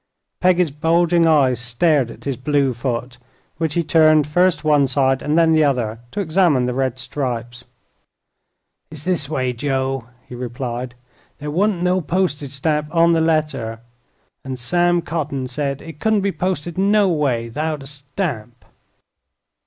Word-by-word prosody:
Peggy's 180 -3 +3
bulging 165 +3 +2
eyes 135 -6 +3
stared 120 +3 +1
at - - -12
his 140 -2 -2
blue 135 0 +1
foot, 120 0 -4 0.4
which 160 -2 -2
he 170 - +1
turned 155 -2 +4
first 175 +4 +2
one 145 -3 +3
side 135 0 +1
and 150 +2 0
then 165 -1 +4
the 155 -1 +4
other 120 -6 0
to 205 - -3
examine 160 -7 +2
the 125 - -1
red 130 -1 -1
stripes. 120 -2 -4 1.2
"It's 155 -2 -10
this 170 -5 0
way, 130 -4 -1
Joe," 135 0 -2 0.2
he - - -11
replied; 125 0 -5 0.4
"there 150 +1 -5
wa'n't 185 +2 +1
no 180 +1 +2
postige 165 -4 -1
stamp 150 +2 -1
on 170 +1 +4
the 165 - +2
letter, 150 -8 0 0.6
an' 130 -1 -5
Sam 175 +6 +1
Cotting 145 -6 -3
said 140 +1 -3
it 160 -2 -10
couldn't 220 0 +2
be 200 0 0
posted 175 -2 -3
no 205 +1 +3
way 140 -9 0
'thout 155 +2 -3
a - - -11
stamp." 140 - -5
150 Hz, 155 wpm, -20 LUFS, 130-165 Hz, 1.2 s, turned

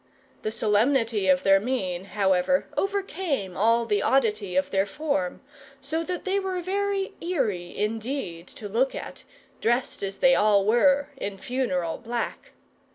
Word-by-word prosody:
The - - -2
solemnity 220 0 +2
of 185 -1 +4
their 195 0 +6
mien, 190 -6 -2
however, 195 +6 +2
overcame 370 - -2
all 230 +3 +3
the 210 -3 +1
oddity 210 -8 +1
of 185 0 +1
their 195 0 +2
form, 240 - -2 0.4
so 300 +4 -2
that 360 +1 -4
they 390 +1 +1
were 380 -2 -2
very 395 +2 -1
eerie 225 - -2
indeed 215 -5 -3
to 210 - -9
look 240 +6 +1
at, - - -7 0.4
dressed 240 +3 0
as 195 -1 -4
they 265 -1 +5
all 205 -3 +4
were 275 +6 +4
in 200 -6 -4
funereal 185 -9 -2
black. 235 0 -4
225 Hz, 145 wpm, -26 LUFS, 195-280 Hz, 0.4 s, their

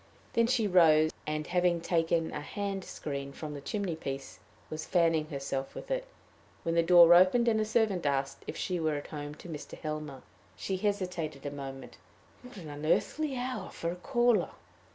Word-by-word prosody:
Then 230 0 +3
she 240 -3 +2
rose, 160 -5 +5 0.2
and, 155 0 -2
having 175 -1 +2
taken 165 -1 +1
a - - -4
hand 195 +4 -4
screen 140 -4 -5
from 150 0 -6
the 145 - -7
chimney 195 +1 -2
piece, 135 - -6 0.3
was 155 0 -5
fanning 165 -3 +2
herself 135 -2 -4
with - - -8
it, - - -1 0.6
when 165 - 0
the 170 - +4
door 170 0 +8
opened, 185 +7 +5
and 220 -2 +3
a - - +1
servant 215 -7 +1
asked 135 -1 -1
if - - -5
she 180 -2 -2
were 155 -2 0
at 145 - -5
home 145 -1 -6
to 165 - -12
Mr. 155 -3 -7
Helmer. 155 -3 -5 0.3
She 190 - -3
hesitated 180 -8 -2
a 145 - -2
moment: 135 -1 -8 0.4
what 250 -3 -12
an 170 -5 -8
unearthly 255 - 0
hour 245 -6 -3
for 170 - -3
a - - -5
caller! 240 +3 +2
170 Hz, 180 wpm, -30 LUFS, 150-200 Hz, 0.6 s, door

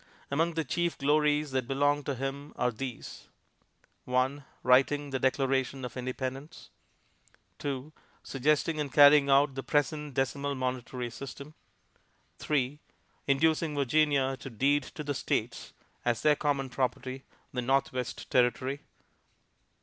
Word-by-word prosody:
Among 165 +4 +1
the 160 - 0
chief 170 +5 -1
glories 150 +1 +2
that 130 -2 -1
belong 145 +1 +1
to 140 - -2
him 135 +3 -5
are 125 - +1
these: 125 +2 -7 0.8
1. 130 +3 0 0.2
Writing 135 +3 +3
the 130 - -1
Declaration 135 0 0
of 125 - -8
Independence. 130 +4 -5 0.9
2. 140 +1 -4 0.3
Suggesting 150 +3 +1
and 145 -3 -2
carrying 145 +1 +7
out 140 +1 +4
the 135 - -4
present 145 0 -1
decimal 140 +1 -1
monetary 125 -1 -3
system. 140 +4 -9 0.9
3. 145 -1 -1 0.5
Inducing 155 +2 +2
Virginia 140 -1 +2
to 135 - -8
deed 140 +5 +2
to 150 +3 -8
the 145 -1 -2
States, - - -2 0.3
as 120 -1 0
their 150 -1 +5
common 140 -3 -1
property, 130 +1 -2 0.3
the 125 - -1
Northwest 130 0 -1
Territory. 130 +3 +1
135 Hz, 125 wpm, -29 LUFS, 130-145 Hz, 0.9 s, carrying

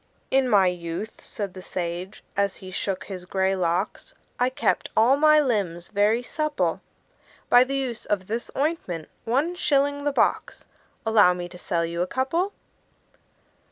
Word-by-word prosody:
"In 265 -1 +3
my 200 -4 +5
youth," 175 +4 -4
said 200 -3 -5
the 185 - -9
sage, 180 +2 -5
as 200 -1 +1
he 185 -1 -10
shook 190 0 -2
his 185 -3 -8
gray 190 +1 +1
locks, 180 +2 -2 0.2
"I 250 +1 +3
kept 260 - 0
all 240 +5 +6
my 305 +1 +6
limbs 200 - -1
very 215 +3 +2
supple 305 +3 -1 0.7
By 245 - +8
the 275 +1 -3
use 255 -4 -3
of 200 -3 0
this 230 +4 -4
ointment 275 - -2 0.2
one 275 +9 +1
shilling 285 -4 +1
the 290 - +1
box - - 0 0.4
Allow 210 -5 +5
me 175 0 -5
to 180 - -11
sell 170 -2 -1
you 170 +1 -3
a 180 - 0
couple." 330 - 0
210 Hz, 160 wpm, -25 LUFS, 180-270 Hz, 0.7 s, By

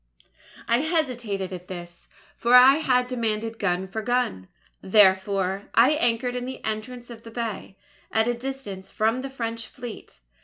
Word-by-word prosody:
"I 235 +1 +3
hesitated 245 - -1
at 180 0 -8
this; 175 -2 -9 0.3
for 240 +1 +3
I 260 +3 +9
had 250 -5 +2
demanded 225 -2 -2
gun 185 -1 0
for 220 +4 -4
gun. 225 - -1 0.3
"Therefore, 190 -1 +3
I 240 +5 +6
anchored 245 -4 +1
in 250 0 -3
the 260 - -6
entrance 240 +3 -5
of 230 -1 -10
the 230 - -11
bay, 225 -4 -5 0.3
at 220 +1 +2
a 240 - +2
distance 235 -7 -6
from 225 +4 0
the 270 - -5
French 230 -3 -4
Fleet. 240 -2 -10
230 Hz, 155 wpm, -25 LUFS, 195-250 Hz, 0.3 s, I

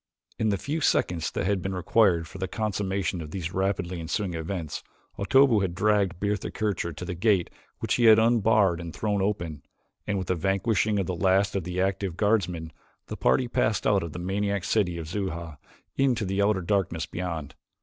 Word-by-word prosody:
In 110 - +2
the 100 - +1
few 155 - -3
seconds 90 - +1
that - - -3
had 100 -1 +1
been 95 +1 -3
required 90 -2 +3
for 95 - -10
the 95 - -2
consummation 95 -4 -2
of 75 - -7
these 85 +1 -5
rapidly 95 -2 -1
ensuing 90 +3 -2
events, 80 -1 -4 0.4
Otobu 130 +2 +5
had 90 -3 -2
dragged 100 -3 +1
Bertha 105 0 -1
Kircher 105 -5 -2
to 85 +3 -7
the 90 - -4
gate 95 0 +1 0.3
which - - -1
he 120 - +2
had 110 -1 +8
unbarred 110 -6 +3
and 85 -2 -7
thrown 105 -2 0
open, 85 -7 -2 0.5
and 105 -1 0
with 95 - -2
the - - +3
vanquishing 100 +4 +1
of 100 - 0
the 90 - -2
last 95 +3 +2
of 95 -4 -1
the 90 +1 -3
active 95 -2 -1
guardsmen, 90 -7 0 0.4
the - - -4
party 125 - +2
passed 110 -2 0
out 100 -2 +3
of 85 - -5
the - - -7
maniac 100 +2 -1
city 95 -5 +1
of 80 -2 -6
Xuja 85 -4 -4 0.4
into 130 -6 +2
the 95 +1 0
outer 100 -1 +2
darkness 85 -3 0
beyond. 85 -5 -5
95 Hz, 190 wpm, -26 LUFS, 85-105 Hz, 0.5 s, had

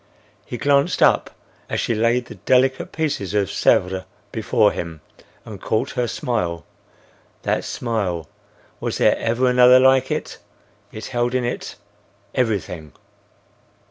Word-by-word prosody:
He 120 - -5
glanced 140 +3 +2
up - - +4 0.4
as - - -1
she - - 0
laid 115 +3 +1
the 120 - -10
delicate 130 +6 +1
piece 155 -2 -1
of 100 - -4 0.2
Sèvres 95 +1 +1 0.3
before - - +2
him, 85 -3 -6 0.4
and 105 -4 -9
caught 110 +5 -1
her 125 -2 -1
smile—That 90 -11 -5
smile! 100 -9 -3 0.5
Was - - -3
there - - +4
ever 120 +3 0
another 125 0 +6
like 130 0 +4
it? - - -4 0.5
It 110 - -8
held 120 0 -1
in 130 - +1
it—everything. 100 - -5
120 Hz, 120 wpm, -21 LUFS, 95-130 Hz, 0.5 s, another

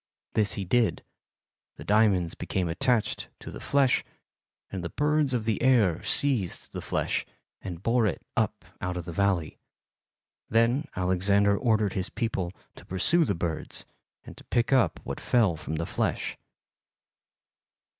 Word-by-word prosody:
This 105 -2 +1
he 100 - -4
did, 115 +5 +2 0.7
the - - -9
diamonds 100 -5 +3
became 90 -2 -2
attached 110 +7 0
to - - -9
the - - -8
flesh, 140 -3 +2 0.7
and 95 -3 -4
the 85 - -3
birds 150 - +1
of 120 -4 -1
the 110 -2 0
air 110 -10 +4
seized 125 -11 +1
the - - -5
flesh - - -1 0.4
and 90 -1 -7
bore 115 -1 +3
it 95 - -3
up - - -1 0.2
out 90 0 -2
of 90 - -5
the 85 - -5
valley. 90 -3 0 0.9
Then 115 +6 +3
Alexander 95 +2 +2
ordered 110 -3 +1
his 95 -1 -2
people 100 -7 -2 0.3
to - - -11
pursue 165 - +2
the 100 - 0
birds 85 -2 -4 0.4
and - - -10
to - - -13
pick 120 +3 +1
up 130 -3 +3
what - - -5
fell 110 -9 +2
from 80 0 -5
the 85 +1 -2
flesh." - - -2
100 Hz, 150 wpm, -27 LUFS, 90-120 Hz, 0.9 s, air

